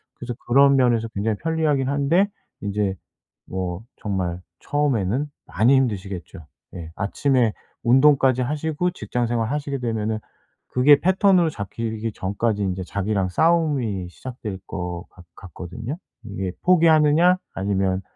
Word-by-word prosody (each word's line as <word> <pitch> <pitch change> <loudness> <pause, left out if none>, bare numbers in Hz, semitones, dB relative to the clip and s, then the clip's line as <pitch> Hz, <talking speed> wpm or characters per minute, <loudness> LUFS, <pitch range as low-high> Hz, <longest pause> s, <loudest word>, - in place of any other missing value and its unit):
그래서 125 0 -6
그런 140 +3 +6
면에서 120 -3 +2
굉장히 105 0 -2
편리하기는 150 -3 0
한데 145 +8 +2 0.3
인제 100 -1 -1 0.5
뭐 90 -1 -4 0.2
정말 90 -4 -3 0.2
처음에는 135 -3 0 0.2
많이 115 +7 +3
힘드시겠죠. 100 - -2 0.3
예. 80 -2 -7
아침에 120 +2 +1 0.3
운동까지 130 0 +4
하시고 155 +6 -1
직장 125 -8 -2
생활하시게 135 +5 -1
되면은 110 -2 -2 0.5
그게 140 +3 +5
패턴으로 185 -2 +4
잡히기 110 -1 -4
전까지 105 +2 -1
인제 95 -1 -2
자기랑 100 0 -1
싸움이 135 - +1
시작될 110 -2 -7
것 90 -2 -5
같 90 - -16
같거든요? 95 - -7 0.3
이게 95 -3 -4
포기하느냐 165 0 +5 0.2
아니면 95 -1 0
115 Hz, 310 characters per minute, -23 LUFS, 100-145 Hz, 0.5 s, 그런